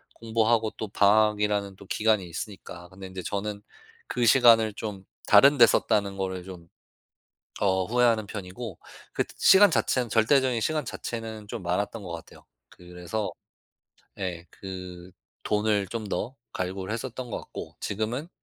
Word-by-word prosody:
공부하고 115 0 +1
또 110 - -4
방학이라는 105 -1 +2
또 100 - -14
기간이 105 -3 +1
있으니까 90 0 -8
근데 95 +1 -10
인제 95 -1 -7
저는 100 0 -3 0.5
그 120 - 0
시간을 115 -3 +6
좀 105 -4 -6 0.3
다른 140 +8 +8
데 120 - +9
썼다는 100 -3 +1
거를 95 -1 -3
좀 90 -3 -11 0.9
어 95 -2 +2
후회하는 115 0 +2
편이고 100 0 -7 0.3
그때 - - -2
시간 200 +1 +7
자체는 125 -6 +1
절대적인 125 +3 +3
시간 155 -1 -1
자체는 110 -3 -6
좀 - - -6
많았던 100 +5 -2
거 90 - -8
같아요. 85 -1 -11 0.2
그래서 90 +4 -5 0.9
예 90 -3 -4
그 90 -2 -9 0.3
돈을 105 -1 +1
좀 115 +2 -4
더 120 +5 -3 0.2
갈구를 95 +2 -4
했었던 125 +1 -5
것 - - -3
같고 - - -9
지금은 110 - -3
105 Hz, 295 characters per minute, -27 LUFS, 95-115 Hz, 0.9 s, 데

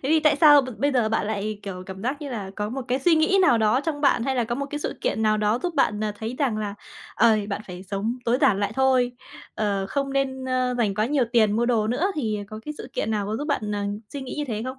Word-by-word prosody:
Thế 265 - -2
thì 315 +1 +4
tại 305 -1 +4
sao 290 -2 +7
b - - -6
bây 285 0 +1
giờ 240 -4 +2
bạn 220 -1 0
lại, 215 0 -3
kiểu, 185 -2 -6
cảm 190 0 -8
giác 270 +5 -2
như 285 - -5
là 205 -6 -5
có 210 0 -2
một 265 +1 -4
cái 255 +2 +1
suy 330 +4 +4
nghĩ 320 +5 +3
nào 245 -10 +5
đó 220 +4 +3
trong 290 -1 -3
bạn, 275 -5 +3
hay 265 0 -1
là 240 - +2
có 235 +1 -2
một 280 +2 -3
cái 295 - -3
sự - - -4
kiện 220 - -1
nào 215 -1 +3
đó 210 +2 +1
giúp 350 -2 -2
bạn, 215 -7 +1
à, 210 - -1
thấy 225 +3 -4
rằng 255 -7 +1
là, 205 -1 -3 0.4
ờ, 225 -1 +5
bạn 200 - -3
phải 180 0 -8
sống 205 +5 -3
tối 240 +2 +2
giản 215 -9 +3
lại 200 +1 -1
thôi, 260 -1 +3 0.4
ờ, 200 -2 -1
không 275 +1 -2
nên, 265 -1 -1
ơ, 255 -1 0
dành 210 -4 +1
quá 215 +2 +1
nhiều 280 -2 +2
tiền 220 -3 +4
mua 235 +3 +1
đồ 225 -3 +2
nữa, 250 +10 0
thì 220 -8 -1
có 215 0 -8
cái 300 - -5
sự - - -8
kiện 220 - -2
nào 210 -2 -1
có 215 - -2
giúp 290 - -4
bạn, 215 -7 -1
à, 205 0 -2 0.3
suy 280 - -5
nghĩ 260 - -6
như 300 - -1
thế 240 -6 -4
không? - - -6
240 Hz, 290 wpm, -24 LUFS, 210-275 Hz, 0.4 s, sao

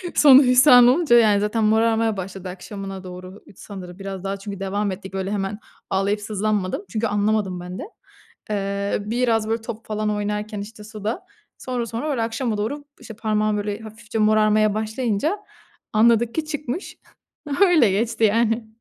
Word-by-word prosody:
sonu 275 -1 +8
hüsran 250 -1 +7
olunca, 270 -2 +4
yani, 215 -3 +5
zaten 210 +2 0
morarmaya 225 0 +2
başladı 190 0 -6
akşamına 195 0 -7
doğru, 185 +1 -9
ıd - - -15
sanırım, 185 -2 -10
biraz 195 -1 -6
daha 195 0 -3
çünkü 195 0 -7
devam 200 +1 -1
ettik; 190 0 -8
böyle 190 +1 -3
hemen 205 +1 -3 0.3
ağlayıp 200 +2 0
sızlanmadım 205 -2 -2
çünkü 220 +3 -1
anlamadım 205 -3 0
ben 180 +1 -7
de. - - -5 0.7
Eee, 200 -1 -1
biraz 225 -1 +1
böyle 225 0 -1
top 225 0 -7
falan 215 0 -2
oynarken 210 0 -3
işte 210 +1 -10
suda, 220 - -5 0.3
sonra 250 -2 -3
sonra, 235 +7 -3
öyle 250 -5 -1
akşama 225 -1 -2
doğru, 285 +8 -3 0.2
işte, 225 - -9
parmağım 215 -1 0
böyle 205 +1 -3
hafifçe 220 0 -7
morarmaya 215 0 +3
başlayınca 220 - -1 0.5
anladık 230 +1 +3
ki 315 -1 -1
çıkmış. 295 +2 -5 0.6
Öyle 325 - +5
geçti 225 +3 -1
yani. 225 +1 +2
215 Hz, 155 wpm, -22 LUFS, 200-230 Hz, 0.7 s, sonu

